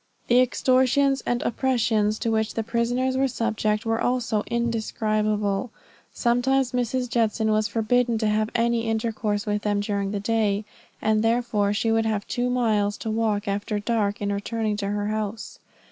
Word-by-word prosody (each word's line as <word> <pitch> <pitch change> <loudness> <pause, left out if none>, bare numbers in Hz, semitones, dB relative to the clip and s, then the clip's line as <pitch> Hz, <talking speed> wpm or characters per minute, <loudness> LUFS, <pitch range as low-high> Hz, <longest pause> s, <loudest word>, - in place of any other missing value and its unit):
The 245 +1 +6
extortions 260 +2 +3
and 240 0 0
oppressions 225 -5 +1
to 230 - -1
which 220 0 0
the 225 - -1
prisoners 245 +3 0
were 270 +1 +3
subject 220 -2 -1
were 225 0 0
also 245 -4 0
indescribable. 215 -2 -1 0.4
Sometimes 250 +2 +1
Mrs. 250 0 -1
Judson 220 -2 +1
was 215 0 +2
forbidden 230 +2 +1
to 220 -1 0
have 215 +1 +1
any 235 -1 +1
intercourse 220 -2 -1
with 210 -1 -1
them 205 -1 0
during 200 -1 -1
the 205 0 -2
day; 210 -1 0 0.4
and 215 0 +2
therefore 225 -3 +1
she 225 +2 0
would 225 0 +2
have 210 -2 -1
two 245 0 -1
miles 215 -5 +1
to 220 - -4
walk 215 -2 0
after 205 +1 -2
dark, 205 -1 -1
in 200 0 0
returning 215 +1 -2
to 200 -1 -2
her 205 0 -2
house. 215 0 -4
220 Hz, 160 wpm, -24 LUFS, 210-235 Hz, 0.4 s, The